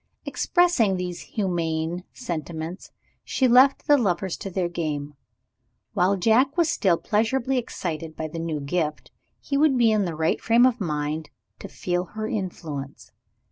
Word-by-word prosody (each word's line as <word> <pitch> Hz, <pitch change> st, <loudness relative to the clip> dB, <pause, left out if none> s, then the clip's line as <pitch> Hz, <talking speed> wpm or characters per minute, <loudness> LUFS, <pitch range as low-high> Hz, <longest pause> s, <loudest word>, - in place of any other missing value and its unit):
Expressing 345 Hz, -, +2 dB
these 180 Hz, -1 st, -4 dB
humane 170 Hz, -3 st, -2 dB
sentiments, 170 Hz, -, -5 dB, 0.3 s
she 260 Hz, -, +1 dB
left 255 Hz, +3 st, +5 dB
the 290 Hz, -1 st, +5 dB
lovers 190 Hz, -4 st, 0 dB
to 195 Hz, -, -6 dB
their 185 Hz, -1 st, -1 dB
game. 150 Hz, -4 st, -3 dB, 0.8 s
While 190 Hz, +3 st, +2 dB
Jack 245 Hz, -, +3 dB
was 335 Hz, -2 st, +3 dB
still 180 Hz, -4 st, +2 dB
pleasurably 240 Hz, +6 st, 0 dB
excited 165 Hz, -8 st, -5 dB
by 160 Hz, -, -4 dB
the 165 Hz, +2 st, -6 dB
new 160 Hz, -3 st, -3 dB
gift, 150 Hz, +1 st, -2 dB, 0.3 s
he 280 Hz, -, -2 dB
would 295 Hz, -3 st, +4 dB
be 235 Hz, -2 st, +4 dB
in 210 Hz, -2 st, +2 dB
the 170 Hz, -3 st, -3 dB
right 160 Hz, +1 st, 0 dB
frame 235 Hz, +2 st, +5 dB
of 250 Hz, -3 st, +1 dB
mind 150 Hz, -2 st, -2 dB, 0.3 s
to -, -, -7 dB
feel 180 Hz, 0 st, -2 dB
her 215 Hz, +4 st, -5 dB
influence. 155 Hz, -9 st, -5 dB
180 Hz, 150 wpm, -25 LUFS, 160-230 Hz, 0.8 s, left